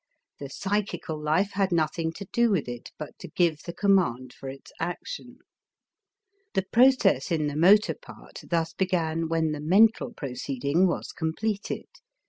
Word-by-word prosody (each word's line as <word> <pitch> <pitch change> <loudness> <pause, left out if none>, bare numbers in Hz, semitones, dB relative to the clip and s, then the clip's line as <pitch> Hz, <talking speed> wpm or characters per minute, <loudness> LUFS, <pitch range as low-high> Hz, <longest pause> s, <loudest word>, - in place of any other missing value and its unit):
The 140 - -6
psychical 195 -1 -2
life 160 +7 +1
had 195 -1 0
nothing 160 0 0
to 200 - -8
do 235 0 +4
with 190 -11 0
it 120 -1 -7
but 150 - -8
to - - -8
give 165 -4 +1
the 170 - -6
command 170 - +1
for 135 - -8
its 135 +1 -11
action. 175 - -5 1.2
The 190 - +2
process 235 - +4
in 155 -3 +1
the 145 -1 -2
motor 195 +7 +5
part - - -13
thus 165 -1 0
began 165 -3 0
when 165 -1 +1
the 150 -1 -4
mental 215 +9 +4
proceeding 140 - 0
was 175 - -3
completed. 200 +6 -3
165 Hz, 150 wpm, -27 LUFS, 150-200 Hz, 1.2 s, motor